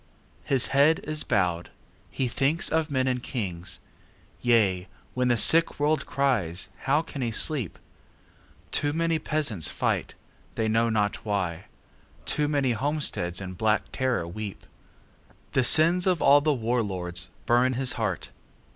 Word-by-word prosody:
His 135 -2 +1
head 145 +4 +4
is 155 0 -3
bowed. 90 -4 0 0.4
He 130 - -2
thinks 140 +7 0
of 160 0 0
men 130 -2 0
and 125 -1 -1
kings. 95 - -4 0.6
Yea, 105 -6 +2 0.3
when 125 0 0
the 120 -1 +2
sick 165 +7 +5
world 150 0 +1
cries, 120 -11 -1 0.2
how 145 +4 +2
can 140 - -7
he 120 - 0
sleep? 120 - 0 0.9
Too 145 0 0
many 165 0 0
peasants 145 - -1
fight, - - -2 0.4
they 110 - 0
know 115 +1 +2
not 105 -2 -1
why; 95 -5 -2 0.6
Too 150 -1 0
many 140 -4 +1
homesteads 120 - 0
in 95 -2 -6
black 110 +3 +1
terror 130 -10 -1
weep. 100 +3 -7 0.9
The 130 - +2
sins 170 +8 +5
of 180 -3 +2
all 145 +1 +6
the 155 +1 +2
war 120 -2 0
lords 90 -3 -4 0.2
burn 125 +2 +3
his 130 0 +2
heart. 105 -7 -3
125 Hz, 145 wpm, -26 LUFS, 100-145 Hz, 0.9 s, all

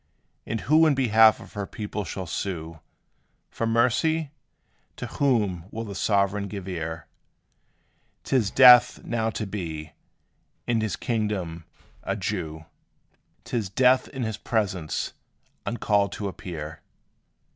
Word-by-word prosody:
And 115 -1 -2
who 160 +3 +5
in 150 - +3
behalf 110 -4 +5
of - - -13
her 100 -2 -4
people 105 -1 -5
shall 95 +3 -5
sue 85 -2 -4 0.7
For 115 - -2
mercy? 130 +7 +2 0.6
To - - -6
whom 105 -11 0
will 115 +2 -5
the 105 -3 -7
sovereign 100 +1 +1
give 100 -2 -7
ear? 80 -3 -4 1.2
'T - - -1
is 115 -6 +3
death 125 -2 +7
now 115 -1 -1
to 110 - -4
be, 80 -6 -5 0.7
in 115 -2 +1
his 110 -2 -1
kingdom, 100 -8 -2 0.4
a - - -2
Jew 80 0 -4 0.8
'T - - -6
is 110 -5 -1
death 130 +5 +4
in 130 -3 -5
his 110 -1 -3
presence 95 -8 -2 0.5
uncalled 100 -3 +1
to 100 - -4
appear. 80 -5 -7
105 Hz, 130 wpm, -25 LUFS, 90-115 Hz, 1.2 s, death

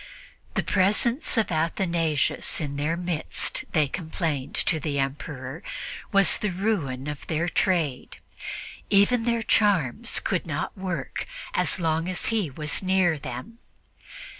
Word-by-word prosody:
The - - +1
presence 215 +8 +3
of 215 -4 +2
Athanasius 165 -2 +1
in 145 -3 -3
their 150 +4 -1
midst, 175 -3 -1
they 155 -3 +3
complained 160 -3 -3
to 160 - +3
the 145 -1 -2
Emperor, 135 +1 -4 0.5
was 195 -1 +6
the 210 - 0
ruin 175 -10 -1
of 150 -1 -6
their 165 +2 0
trade. 165 -7 0 0.7
Even 215 +4 +4
their 235 -1 +1
charms 195 - +2
would - - 0
not - - -3
work 185 -3 -4 0.3
as - - +3
long 165 +1 0
as 185 - 0
he 210 -8 +1
was 150 +2 -2
near 185 -4 +2
them. 130 - -7
170 Hz, 130 wpm, -26 LUFS, 150-195 Hz, 0.7 s, was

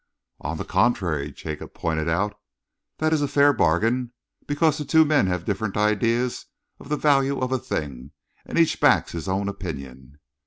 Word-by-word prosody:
"On - - -4
the - - -5
contrary," 90 -8 0
Jacob 80 -1 -8
pointed 80 -1 -1
out, 100 +5 0 0.6
"that 155 0 +1
is 155 - +2
a 145 - +1
fair 145 +1 +4
bargain, 115 - +1 0.3
because 155 +1 +1
the - - -2
two 160 +2 +4
men 145 -9 +3
have 90 -1 -2
different 100 0 -2
ideas 115 +4 +1 0.3
of - - -13
the 150 - 0
value 140 -2 +2
of 130 0 -2
a 130 - +1
thing, 70 - -5 0.3
and - - -5
each 165 -1 +3
backs - - +3
his 85 +2 -6
own 95 +1 -1
opinion." 70 -9 -7
105 Hz, 170 wpm, -24 LUFS, 85-140 Hz, 0.6 s, fair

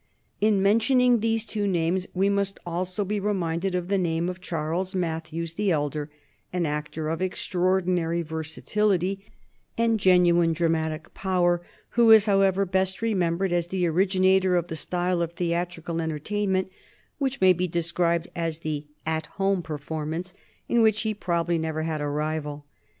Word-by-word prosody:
In 205 -2 +3
mentioning 240 +4 +4
these 225 0 0
two 210 -2 -2
names, 180 0 0
we 190 +2 +2
must 200 -1 0
also 180 +3 -2
be 205 +2 -1
reminded 185 -2 -1
of 180 -1 -2
the 200 0 +1
name 170 -1 0
of 180 0 -7
Charles 175 +2 -3
Mathews 165 -1 -3
the 205 +3 0
elder, 150 -2 -1 0.4
an 180 -1 0
actor 150 +1 -3
of 165 +2 -2
extraordinary 180 -2 0
versatility 185 +5 -1 0.5
and 230 -1 +2
genuine 175 -3 +4
dramatic 160 0 -1
power, 175 -2 +1 0.3
who 235 -1 +4
is, 220 -2 +8
however, 195 -1 +3
best 190 +2 0
remembered 185 -4 +1
as 175 -1 +1
the 180 0 -1
originator 185 +1 +3
of 175 -1 0
the 160 - -3
style 180 +2 -1
of 170 0 -2
theatrical 170 -1 -2
entertainment 190 +5 -1 0.5
which 275 -1 -1
may 185 -1 +6
be 180 +1 -1
described 170 0 0
as 165 -1 -3
the 150 -1 -4 0.2
"At 160 -1 -2
Home" 195 -1 +1
performance, 160 +3 -5 0.3
in 235 - +3
which 215 -1 +3
he 220 -1 0
probably 170 -4 -1
never 160 -1 -2
had 155 -2 -2
a 145 - -1
rival. 150 0 -3
180 Hz, 150 wpm, -26 LUFS, 165-195 Hz, 0.5 s, is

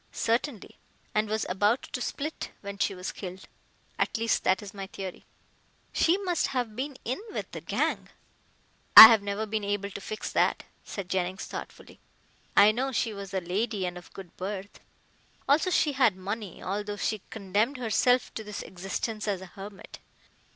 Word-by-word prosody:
"Certainly, 230 -1 -2 0.3
and 215 0 +1
was 215 +1 -1
about 205 +6 +1
to 250 - -3
split 300 +5 -4
when 200 -1 -7
she 195 - +1
was 180 +1 -5
killed. 185 -1 -8 0.5
At - - +1
least, 230 0 +1
that 190 +2 +2
is 200 - -9
my 195 -1 -6
theory." 190 -2 -8 0.7
"She 340 +3 +3
must 365 -4 0
have 245 -5 -2
been 270 +2 -4
in 255 - -2
with - - -5
the - - -7
gang." - - -1 0.9
"I 220 - +16
have 225 -3 +4
never 200 +2 -2
been 215 0 -2
able 200 0 -2
to 200 - -7
fix 215 +2 -5
that," - - +1 0.2
said 200 -3 -6
Jennings 185 0 -2
thoughtfully. - - -9 0.6
"I 205 +1 +8
know 260 +5 -2
she 230 -3 -1
was 200 -1 -8
a 190 -1 -1
lady 195 +3 -1
and 180 0 -4
of 175 -1 -11
good 190 -3 -11
birth. 195 +1 -6 0.7
Also 305 +6 +3
she 310 -4 +2
had 255 -7 +3
money, 200 +1 -6
although 205 +2 -3
she 215 0 -1
condemned 215 +6 -1
herself 245 +1 +2
to 220 - -5
this 210 -1 -6
existence 195 +4 -4
as 200 -3 0
a 190 - -9
hermit. 200 0 -10
205 Hz, 170 wpm, -28 LUFS, 195-230 Hz, 0.9 s, I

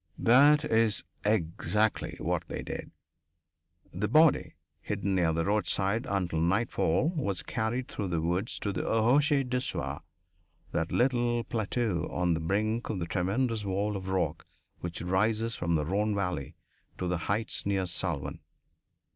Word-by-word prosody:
That 145 +5 +6
is 110 - +2 0.2
exactly 105 +1 0
what - - -1
they - - -5
did. - - -6 1.0
The 100 +4 -1
body, 155 +2 +4 0.3
hidden 100 -1 -2
near 85 -3 +3
the 85 +1 0
roadside 105 +2 0
until 90 -5 0
nightfall, 95 - +2
was 115 - -2
carried 120 +3 -2
through 100 - -4
the 85 -2 0
woods 90 +7 -1
to 100 - -1
the - - -2
rochers 135 +5 +3
du 125 0 0
soir, - - -4 0.7
that 80 -1 -1
little 120 -2 +2
plateau 110 -6 -1
on 90 -1 +1
the 80 - -1
brink 110 +7 -1
of 110 - -1
the 85 - -2
tremendous 105 +6 0
wall 100 +2 -1
of 95 -1 -5
rock 85 -5 -1 0.3
which 85 -1 -5
rises 110 +5 +1
from 85 -1 0
the 75 -1 0
Rhone 105 +5 0
valley 90 -9 -2 0.4
to 90 - -2
the 90 -1 0
heights 105 0 -1
near 95 -2 +1
Salvan. 85 -4 -3
100 Hz, 145 wpm, -29 LUFS, 90-115 Hz, 1.0 s, That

